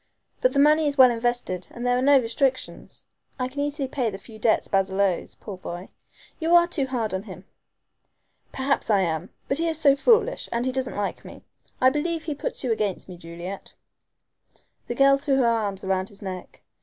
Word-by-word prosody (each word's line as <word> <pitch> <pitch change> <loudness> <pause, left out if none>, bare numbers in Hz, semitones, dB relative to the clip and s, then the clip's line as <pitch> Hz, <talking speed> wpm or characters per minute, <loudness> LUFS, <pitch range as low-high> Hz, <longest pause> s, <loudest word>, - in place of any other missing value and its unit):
But - - +3
the - - -1
money 305 +2 +5
is 285 0 -1
well 255 -2 +8
invested 235 -6 -2
and 240 +1 -7
there 245 0 +3
are 250 - +1
no 280 +1 +6
restrictions. 255 +2 -2 0.3
I 255 -1 -1
can 265 +2 -8
easily 285 -1 -1
pay 255 -3 -1
the 195 - -6
few 215 +2 -14
debts 220 +1 +2
Basil 195 0 0
owes, 195 -3 0
poor 200 -4 -9
boy. 175 +1 -7 0.5
You 330 +1 +3
are 345 0 +7
too 310 -6 -1
hard 235 -5 -2
on 190 - -1
him." 190 -2 -11 1.1
"Perhaps 270 -1 -1
I 205 -3 +4
am. 165 0 -2 0.2
But 275 - 0
he 335 - +1
is 325 -2 0
so 280 -3 +5
foolish, 460 - +2
and 235 +1 -1
he 260 - 0
doesn't 260 0 -3
like 205 -1 -3
me. - - -12 0.4
I 255 +1 +5
believe 320 +3 -2
he 310 - -3
puts 285 - -4
you 250 - 0
against 210 -4 -1
me, 180 - -9
Juliet." 170 +3 -8 1.1
The 240 - -3
girl 275 +1 +5
threw 275 -1 +1
her 265 -2 +3
arms 210 -4 0
round 190 0 -1
his 205 0 -11
neck. 185 -2 -8
245 Hz, 205 wpm, -25 LUFS, 195-280 Hz, 1.1 s, well